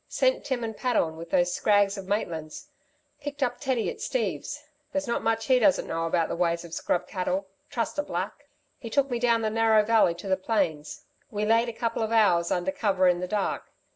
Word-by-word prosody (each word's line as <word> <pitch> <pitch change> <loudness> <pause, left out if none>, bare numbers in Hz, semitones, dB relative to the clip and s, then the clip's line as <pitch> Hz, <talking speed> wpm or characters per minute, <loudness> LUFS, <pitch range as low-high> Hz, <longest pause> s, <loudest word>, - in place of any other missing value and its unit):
Sent - - +1
Tim 260 -4 -2
and 225 -1 -4
Pat 250 +1 -1
on 160 -5 +1
with 165 +1 -9
those 175 0 +2
scrags 205 0 +3
of 195 -1 -8
Maitland's! 165 -7 -3 0.5
Picked 290 -1 -3
up 245 -1 -1
Teddy 260 -5 0
at - - -5
Steve's. 455 -11 -2 0.3
There's 285 0 -2
not 235 - 0
much 225 0 0
he 260 -2 +4
doesn't 200 -5 +3
know 165 0 -2
about 165 -1 +1
the - - -3
ways 170 0 0
of 165 - -11
scrub 180 +1 -1
cattle. 185 0 -2 0.2
Trust 235 +5 -2
a - - +4
black! - - -5 0.3
He 230 - -7
took 275 +2 +1
me 240 - 0
down 235 -1 +2
Narrow 220 -1 +4
Valley 220 -6 +4
to 175 +3 -9
the 190 0 +2
plains. 175 -8 -1 0.3
We 210 0 -2
laid 230 +2 +3
a - - -3
couple 230 0 -2
of 220 0 -1
hours 180 -7 +4
under 180 +9 0
cover 195 -8 +2
in 175 -1 +3
the 180 - -3
dark. 205 0 -2
215 Hz, 215 wpm, -27 LUFS, 180-235 Hz, 0.5 s, he